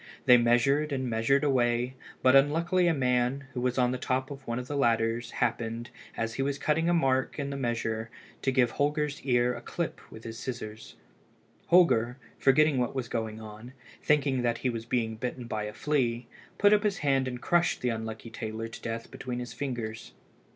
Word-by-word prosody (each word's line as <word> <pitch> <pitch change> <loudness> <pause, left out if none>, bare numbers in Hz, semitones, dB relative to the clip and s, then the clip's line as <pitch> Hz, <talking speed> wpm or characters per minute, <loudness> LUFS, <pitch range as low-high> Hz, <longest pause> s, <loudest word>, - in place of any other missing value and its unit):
They 125 - +8
measured 135 +6 +3
and 130 -2 -1
measured 115 +5 +2
away, 125 -2 +1 0.3
but 130 +1 +6
unluckily 170 +6 +3
a - - +4
man, 125 +1 +1
who 125 - -3
was 125 0 0
on 125 -1 +3
the 130 - -3
top 130 +2 -1
of 135 -1 -9
one 115 0 -2
of 125 0 -5
the 145 - -4
ladders, 115 -2 +1
happened, 115 +1 -2 0.3
as 115 0 -2
he 135 - -3
was 140 0 -1
cutting 160 +3 +1
a - - +3
mark 135 -5 +1
in 140 -2 -3
the - - -4
measure, 115 -3 -2 0.3
to 135 - +1
give 125 -3 +3
Holger's 150 0 -1
ear 125 -2 +2
a - - -8
clip - - -4
with 110 - -11
the 115 - -6
scissors. 110 -2 -7 0.7
Holger, 125 -9 +4 0.2
forgetting 140 +1 +4
what 125 +1 -1
was 130 -3 -2
going 110 -2 -3
on, 110 +3 -10 0.3
thinking 140 -3 +2
that 120 -1 0
he 125 - +3
was 115 -1 -5
being 115 -3 -1
bitten 125 +1 -4
by 110 -2 -3
a 105 - -6
flea, 125 -3 0 0.3
put 205 +1 +5
up 210 - +4
his 205 -2 0
hand 135 -2 +2
and 125 -1 -4
crushed 175 +5 +1
the 125 - +1
unlucky 110 0 -5
tailor 110 0 -5
to 115 - -10
death 115 0 -5
between 125 -2 -5
his 125 0 -5
fingers. 120 -6 -5
125 Hz, 195 wpm, -29 LUFS, 115-140 Hz, 0.7 s, They